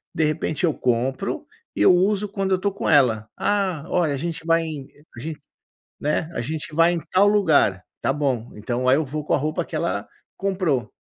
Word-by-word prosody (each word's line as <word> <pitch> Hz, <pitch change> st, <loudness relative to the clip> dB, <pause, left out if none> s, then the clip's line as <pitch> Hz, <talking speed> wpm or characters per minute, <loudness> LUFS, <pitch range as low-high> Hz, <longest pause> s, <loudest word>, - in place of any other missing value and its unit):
De 160 Hz, -, +1 dB
repente 155 Hz, +2 st, -1 dB
eu 160 Hz, -, +2 dB
compro 125 Hz, +1 st, -1 dB, 0.3 s
e -, -, -2 dB
eu 140 Hz, -, +7 dB
uso 200 Hz, +3 st, +2 dB
quando 195 Hz, -1 st, -2 dB
eu 185 Hz, -, +3 dB
tô 200 Hz, +2 st, 0 dB
com 195 Hz, -, -3 dB
ela. 120 Hz, -8 st, +4 dB
"Ah, 190 Hz, -7 st, 0 dB
olha, 170 Hz, -5 st, +1 dB
a -, -, -2 dB
gente 165 Hz, +2 st, -4 dB
vai 165 Hz, 0 st, +3 dB, 0.5 s
a -, -, -9 dB
gente 155 Hz, +4 st, -6 dB, 0.6 s
né, 150 Hz, +2 st, -1 dB
a 120 Hz, -, -2 dB
gente 155 Hz, +4 st, -5 dB
vai 165 Hz, +1 st, +5 dB
em 170 Hz, -, -1 dB
tal 195 Hz, +2 st, +5 dB
lugar". 155 Hz, -, +3 dB, 0.2 s
Tá -, -, +1 dB
bom. 130 Hz, -5 st, -1 dB
Então 120 Hz, +4 st, -2 dB
aí 130 Hz, -, +6 dB
eu 155 Hz, -, 0 dB
vou 150 Hz, +3 st, -4 dB
com -, -, -1 dB
a -, -, +2 dB
roupa 155 Hz, +4 st, -1 dB
que -, -, -7 dB
ela 100 Hz, -8 st, -1 dB, 0.3 s
comprou. 180 Hz, -, -1 dB
155 Hz, 205 wpm, -23 LUFS, 130-180 Hz, 0.6 s, eu